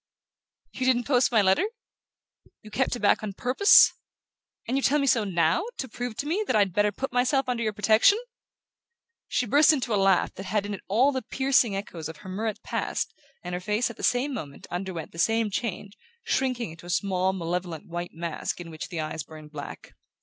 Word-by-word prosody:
"You 255 - -2
didn't 245 -2 +3
post 250 -1 +2
my 220 -3 +4
letter? 190 - +3 1.0
You 215 - -12
kept 260 +2 0
it 240 - -7
back 205 - +3
on 210 -2 -5
purpose? 255 - +6 0.7
And 250 - -1
you 275 - +1
tell 285 +2 +3
me 280 - +1
so 240 -5 +3
NOW, 175 - +1
to 260 - -4
prove 245 -2 -5
to 285 - -3
me 355 +8 0
that 255 - +1
I'd 200 -4 +3
better 205 +2 +2
put 265 +5 -5
myself 260 +2 +2
under 245 -2 -1
your 220 -2 0
protection?" 215 - +4 1.1
She 250 - 0
burst 290 +7 +5
into 255 -6 -1
a 200 - +2
laugh 195 -2 +3
that 190 - -8
had 210 -2 0
in 205 - -4
it 195 - -6
all 245 +8 +3
the 260 -2 -2
piercing 260 -3 +2
echoes 170 -5 -5
of 160 - -9
her 185 - -11
Murrett 215 +3 -3
past, - - -2 0.3
and 180 0 -5
her 180 - -3
face, 210 +5 0
at 235 - -14
the - - -9
same 260 +3 +1
moment, 145 - -7
underwent 175 -2 -5
the 165 - -10
same 225 +2 +2
change, 205 -1 -4 0.3
shrinking 250 -7 -1
into 165 +2 -12
a - - -9
small 185 0 +1
malevolent 175 -2 -4
white 175 0 -6
mask 170 0 -4
in 170 -1 -8
which 155 - -7
the 170 - -5
eyes 155 0 -3
burned 155 0 -12
black. 145 -2 -9
210 Hz, 210 wpm, -26 LUFS, 180-250 Hz, 1.1 s, purpose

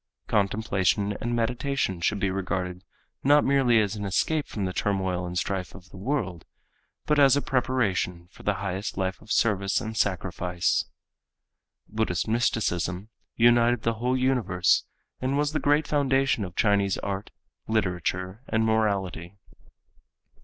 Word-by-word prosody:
Contemplation 100 -1 +1
and 120 +1 -1
meditation 120 -4 -1
should 100 +4 +1
be 95 -1 0
regarded 90 -1 -3 0.4
not 145 +2 +5
merely 130 -4 +4
as 105 -1 0
an 105 - -5
escape 145 +10 0
from 100 -3 -3
the 90 - -3
turmoil 95 -3 -1
and 90 0 -4
strife 95 0 -2
of 90 -2 -14
the - - -12
world, 95 - -2 0.6
but 150 -1 +2
as 140 -1 +6
a - - +4
preparation 115 -10 0
for - - -15
the 105 - 0
highest 95 +1 -4
life 95 -1 -2
of 110 - -11
service 100 -3 +2
and 110 0 -5
sacrifice. 90 -3 0 1.0
Buddhist 110 -5 -1
mysticism 105 -4 0 0.3
united 120 0 +4
the 115 - +1
whole 125 +1 +1
universe 125 -9 +2 0.3
and 130 +2 -1
was 145 0 +1
the 155 - -1
great 145 +1 +2
foundation 135 -4 +2
of 90 -2 -7
Chinese 100 -3 +2
art, 100 0 -4 0.4
literature 95 -1 -1
and 110 0 +1
morality. 100 -4 -1
105 Hz, 140 wpm, -26 LUFS, 95-120 Hz, 1.0 s, as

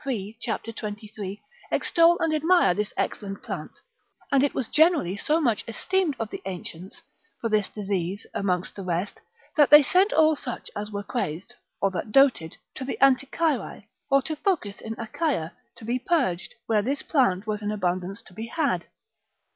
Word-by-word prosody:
3. 220 -5 -3
cap. 225 - -2
23, 210 -2 -7 0.3
extol 340 0 +4
and 325 -1 +1
admire 320 - +4
this 210 +2 -2
excellent 200 -2 -3
plant; - - -6 0.5
and 275 -1 +5
it 285 - +1
was 255 - -1
generally 315 - +3
so 300 +10 +1
much 240 -9 +1
esteemed 355 - 0
of 225 - -2
the - - -6
ancients 180 0 -7 0.4
for 230 - -2
this 210 -2 +1
disease 195 -2 -3
amongst 180 -2 -1
the 200 - -6
rest, 180 +1 -3 0.3
that 295 -2 +5
they 295 0 +10
sent 375 +8 +3
all 315 0 +5
such 250 -4 -7
as 210 +1 -4
were 205 -1 -4
crazed, 200 -1 -4 0.3
or 195 - +3
that 185 +3 -4
doted, 250 - +4 0.2
to - - -6
the 265 - -4
Anticyrae, 275 0 +2 0.3
or 275 0 +4
to 310 +3 -2
Phocis 290 - -1
in 225 0 -6
Achaia, 230 - -2 0.2
to 230 -2 -12
be 245 +3 0
purged, 255 - 0
where 220 -2 +2
this 270 +6 -1
plant 230 - +2
was 215 -1 -2
in 205 0 -2
abundance 185 0 -2
to - - -17
be 220 +5 -6
had. 320 +7 -1
225 Hz, 170 wpm, -26 LUFS, 200-280 Hz, 0.5 s, they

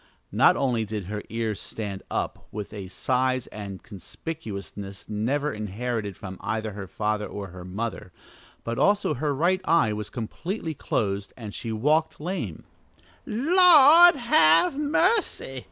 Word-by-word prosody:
Not - - +5
only 125 -5 +1
did 105 -2 -5
her 105 +2 -4
ears 110 -3 -2
stand 100 -3 -5
up - - -3
with 105 0 -6
a 100 -3 -6
size 130 +5 0
and 100 -3 -8
conspicuousness 100 - -7
never 130 +8 -1
inherited 105 -1 -4
from 95 -1 -8
either 110 -1 -2
her 100 -1 -7
father 105 0 -2
or 100 -1 -7
her 90 0 -10
mother, 95 +1 -5 0.5
but 115 0 -3
also 205 -6 +3
her 145 +2 -1
right 175 +7 +1
eye 165 -12 +3
was 105 0 -5
completely 160 - -4
closed 100 -7 -2
and 110 -4 -8
she 115 - -5
walked 150 +9 +1
lame. 180 +6 -4 0.6
"The - - -8 0.2
Lord 345 -1 +9
have 175 - +4
mercy!" 295 - 0
115 Hz, 140 wpm, -25 LUFS, 105-160 Hz, 0.6 s, Lord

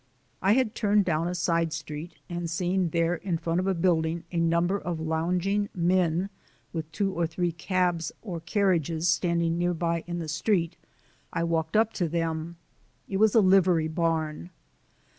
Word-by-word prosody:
I 195 +3 +4
had 245 -3 +2
turned 205 -3 +2
down 165 -1 0
a 180 - -2
side 165 -1 +1
street, 155 +1 -6
and 175 -1 -4
seeing 180 +1 0
there 165 +1 +1
in 180 -2 -2
front 165 +1 -1
of 185 - -1
a 190 - +1
building 165 -1 +1
a 170 - -1
number 170 +4 +2
of 170 -2 -4
lounging 180 +6 0
men 180 +1 +1 0.4
with 160 -2 -4
two 195 +4 -1
or 170 -2 0
three 175 +2 -1
cabs 170 0 0
or 180 -7 -5
carriages 170 -2 +1
standing 170 0 +1
nearby 170 -1 0
in 175 0 -3
the 165 -2 -4
street 170 +1 0 0.6
I 170 - -1
walked 165 +2 0
up 225 0 +3
to 175 -4 -1
them. 165 0 -2 0.5
It 195 - -2
was 215 +1 +4
a 225 - +7
livery 185 -4 +4
barn. 160 - -1
170 Hz, 165 wpm, -27 LUFS, 165-185 Hz, 0.6 s, a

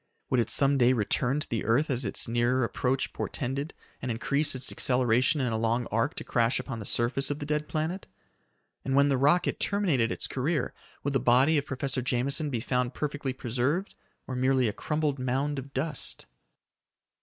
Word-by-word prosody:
Would 125 - +3
it 115 - +1
some 140 0 +4
day 125 +1 +5
return 125 +4 0
to - - -4
the 115 - -2
earth 130 +8 +2
as 130 0 0
its - - +1
nearer 120 +2 +1
approach 125 +3 -1
portended, 140 +3 -3 0.3
and 130 - -3
increase 140 +6 +1
its 130 0 -4
acceleration 125 +3 +2
in 125 -4 0
a 110 - -1
long 115 +2 +1
arc 115 +8 0
to - - -4
crash 115 0 +1
upon 130 -4 -5
the 105 - -6
surface 125 +6 +1
of 145 - -2
the 145 - -6
dead 150 0 -1
planet? 160 +5 -3 0.8
And 135 - -1
when 140 +1 +5
the 135 - +3
rocket 145 +7 +2
terminated 165 - +1
its - - -1
career, 140 +1 -1 0.3
would 140 - -1
the 135 - +3
body 130 +6 +4
of 140 - -7
Professor 130 -1 -1
Jameson 135 +5 -1
be 120 -5 -2
found 125 0 -1
perfectly 145 -2 -2
preserved 130 - -1 0.3
or 130 - -5
merely 130 -1 +2
a 105 - -1
crumbled 150 0 -1
mound 135 +3 -1
of 135 +1 -9
dust? 145 +2 -1
130 Hz, 190 wpm, -28 LUFS, 125-145 Hz, 0.8 s, day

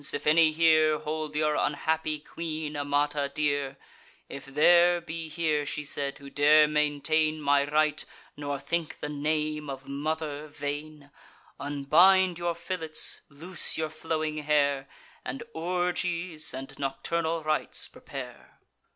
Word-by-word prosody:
if - - -4
any 155 +1 +5
here 155 -1 +4
Hold 155 0 -4
your 150 0 +2
unhappy 155 +1 0
queen, 155 -1 -5
Amata, 145 0 0
dear; 145 -2 -1 0.5
If 140 - -8
there 175 +5 +5
be 165 -1 -6
here," 155 -2 0
she 145 +1 -4
said, 140 -1 -3
"who 140 - -12
dare 150 +2 +5
maintain 150 +1 +1
My 145 -1 +2
right, 150 0 +2 0.3
nor 145 -1 -4
think 160 +3 -3
the 150 - -4
name 150 0 -1
of 135 0 -7
mother 150 +1 -3
vain; 145 0 -6 0.5
Unbind 170 +6 +4
your 170 -1 -1
fillets, 165 -3 -3
loose 165 +6 +1
your 155 -1 -2
flowing 155 -1 -2
hair, 145 -2 +1 0.3
And 130 +2 -5
orgies 175 -1 -2
and 135 +1 -7
nocturnal 160 +4 -1
rites 155 0 -1
prepare." - - -10
150 Hz, 125 wpm, -28 LUFS, 145-160 Hz, 0.5 s, any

